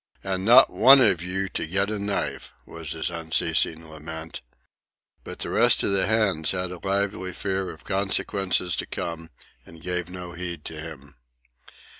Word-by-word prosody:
"And 95 Hz, -1 st, -2 dB
not 120 Hz, +5 st, +7 dB
one 135 Hz, +1 st, +7 dB
of 90 Hz, -9 st, +4 dB
you 95 Hz, +2 st, -2 dB
to -, -, -3 dB
get 95 Hz, +4 st, 0 dB
a 105 Hz, -, -2 dB
knife!" 100 Hz, 0 st, -3 dB
was 80 Hz, -3 st, -7 dB
his 80 Hz, +1 st, -2 dB
unceasing 80 Hz, 0 st, -1 dB
lament. 80 Hz, +1 st, -8 dB, 0.8 s
But -, -, -8 dB
the -, -, -4 dB
rest -, -, +4 dB
of -, -, +1 dB
the 95 Hz, -1 st, +2 dB
hands 100 Hz, -8 st, +1 dB
had 90 Hz, -1 st, -3 dB
a 90 Hz, -, -7 dB
lively 95 Hz, -1 st, -2 dB
fear 95 Hz, 0 st, -2 dB
of 80 Hz, -2 st, -11 dB
consequences 95 Hz, -2 st, -1 dB
to -, -, -3 dB
come 80 Hz, -1 st, -5 dB, 0.3 s
and 80 Hz, -, -15 dB
gave 90 Hz, +1 st, -3 dB
no 90 Hz, -1 st, -8 dB
heed 85 Hz, -3 st, -5 dB
to 80 Hz, -, -7 dB
him. 70 Hz, -4 st, -11 dB
90 Hz, 165 wpm, -25 LUFS, 80-95 Hz, 0.8 s, not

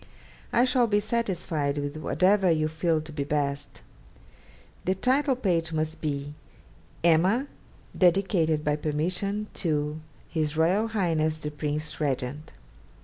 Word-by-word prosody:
I 240 Hz, -, +4 dB
shall 250 Hz, -2 st, +3 dB
be 205 Hz, -1 st, +3 dB
satisfied 175 Hz, -10 st, -1 dB
with 145 Hz, 0 st, -3 dB
whatever 185 Hz, +5 st, +2 dB
you 155 Hz, -2 st, +2 dB
feel 160 Hz, 0 st, 0 dB
to 155 Hz, +1 st, -10 dB
be 145 Hz, -2 st, -2 dB
best. 145 Hz, 0 st, -2 dB, 1.0 s
The 185 Hz, -, +1 dB
title 265 Hz, +6 st, +2 dB
page 170 Hz, -8 st, 0 dB
must 155 Hz, 0 st, -2 dB
be 145 Hz, -1 st, -3 dB, 0.7 s
"Emma, 180 Hz, -, +4 dB, 0.5 s
dedicated 175 Hz, -4 st, +2 dB
by 150 Hz, 0 st, +1 dB
permission 180 Hz, +8 st, -1 dB, 0.2 s
to 150 Hz, -2 st, -1 dB, 0.3 s
H.R.H. 165 Hz, +7 st, +1 dB, 0.5 s
the 150 Hz, -, -4 dB
Prince 150 Hz, +1 st, -3 dB
Regent." 140 Hz, +2 st, -2 dB
160 Hz, 115 wpm, -27 LUFS, 150-190 Hz, 1.0 s, I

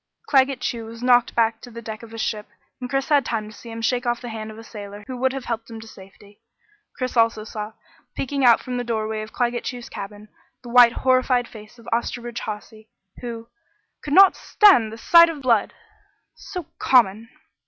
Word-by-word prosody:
Claggett 270 Hz, -, +3 dB
Chew 230 Hz, -2 st, -3 dB
was 230 Hz, +1 st, -10 dB
knocked 245 Hz, -1 st, +3 dB
back 225 Hz, -1 st, +1 dB
to 245 Hz, -, -11 dB
the 230 Hz, 0 st, -9 dB
deck 220 Hz, -1 st, -7 dB
of 230 Hz, -, -12 dB
his 225 Hz, 0 st, -6 dB
ship, 210 Hz, -1 st, -3 dB, 0.3 s
and 250 Hz, -1 st, -6 dB
Chris 270 Hz, 0 st, -1 dB
had 290 Hz, -3 st, +4 dB
time 220 Hz, -3 st, -3 dB
to -, -, -14 dB
see 235 Hz, -, -12 dB
him 230 Hz, 0 st, -7 dB
shake 245 Hz, +1 st, 0 dB
off 240 Hz, 0 st, 0 dB
the 245 Hz, -, -8 dB
hand 220 Hz, -1 st, -6 dB
of 215 Hz, -, -11 dB
a 225 Hz, -, -10 dB
sailor 205 Hz, -2 st, -10 dB
who 255 Hz, -, -6 dB
would 260 Hz, +1 st, +1 dB
have 270 Hz, -1 st, -6 dB
helped 230 Hz, -1 st, -4 dB
him 225 Hz, -1 st, -8 dB
to 225 Hz, -, -12 dB
safety. 200 Hz, 0 st, -16 dB, 0.6 s
Chris 255 Hz, -2 st, -3 dB
also 230 Hz, -2 st, +2 dB
saw, 215 Hz, 0 st, -7 dB, 0.4 s
peeking 275 Hz, +1 st, -2 dB
out 235 Hz, -2 st, +6 dB
from 250 Hz, -1 st, -5 dB
the 245 Hz, -, -2 dB
doorway 220 Hz, -2 st, -2 dB
of 215 Hz, -, -8 dB
Claggett 240 Hz, -1 st, -1 dB
Chew's 245 Hz, -1 st, -6 dB
cabin, 205 Hz, +1 st, -9 dB, 0.4 s
the 240 Hz, -, -9 dB
white 240 Hz, -1 st, +7 dB
horrified 255 Hz, -1 st, +3 dB
face 215 Hz, +2 st, -14 dB
of 230 Hz, -, -17 dB
Osterbridge 240 Hz, 0 st, -3 dB
Hawsey, 215 Hz, +1 st, -8 dB, 0.3 s
who 230 Hz, -2 st, -7 dB, 0.6 s
"could 290 Hz, -, -4 dB
not 390 Hz, -1 st, +8 dB
stand 310 Hz, -, +4 dB
the 225 Hz, -, -8 dB
sight 335 Hz, +7 st, +6 dB
of 300 Hz, -4 st, -7 dB
blood 230 Hz, -5 st, +2 dB, 0.6 s
so 360 Hz, -4 st, -8 dB
common!" 230 Hz, -3 st, +3 dB
235 Hz, 205 wpm, -22 LUFS, 220-250 Hz, 0.6 s, not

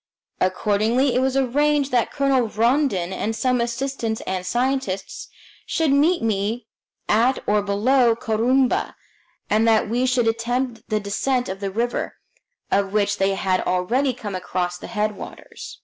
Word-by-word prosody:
Accordingly, 215 Hz, +7 st, +1 dB
it 250 Hz, -, +2 dB
was 265 Hz, 0 st, +1 dB
arranged 280 Hz, +2 st, +1 dB
that 245 Hz, -2 st, +2 dB
Colonel 270 Hz, -4 st, +1 dB
Rondon 220 Hz, -, +1 dB
and 220 Hz, +3 st, -2 dB
some 250 Hz, +1 st, +1 dB
assistants 235 Hz, -1 st, -2 dB
and 185 Hz, -1 st, -3 dB
scientists 240 Hz, -2 st, -2 dB, 0.4 s
should 320 Hz, -4 st, +1 dB
meet 305 Hz, +4 st, +3 dB
me 215 Hz, +2 st, -1 dB, 0.4 s
at 235 Hz, +5 st, +3 dB
or 210 Hz, 0 st, +2 dB
below 230 Hz, +4 st, +2 dB
Corumba, 240 Hz, +4 st, +1 dB, 0.5 s
and 220 Hz, +2 st, +2 dB
that 220 Hz, -1 st, +3 dB
we 245 Hz, +4 st, 0 dB
should 250 Hz, -2 st, +2 dB
attempt 235 Hz, +1 st, -2 dB
the 215 Hz, -, +1 dB
descent 245 Hz, +5 st, -1 dB
of 190 Hz, +1 st, -5 dB
the 200 Hz, -1 st, -3 dB
river, 235 Hz, +5 st, -2 dB, 0.6 s
of 195 Hz, 0 st, +1 dB
which 210 Hz, -1 st, +1 dB
they 195 Hz, 0 st, +2 dB
had 190 Hz, -1 st, 0 dB
already 230 Hz, +10 st, +1 dB
come 215 Hz, -5 st, -7 dB
across 180 Hz, -1 st, -2 dB
the -, -, -8 dB
headwaters. 210 Hz, -1 st, -5 dB
230 Hz, 145 wpm, -22 LUFS, 205-260 Hz, 0.6 s, meet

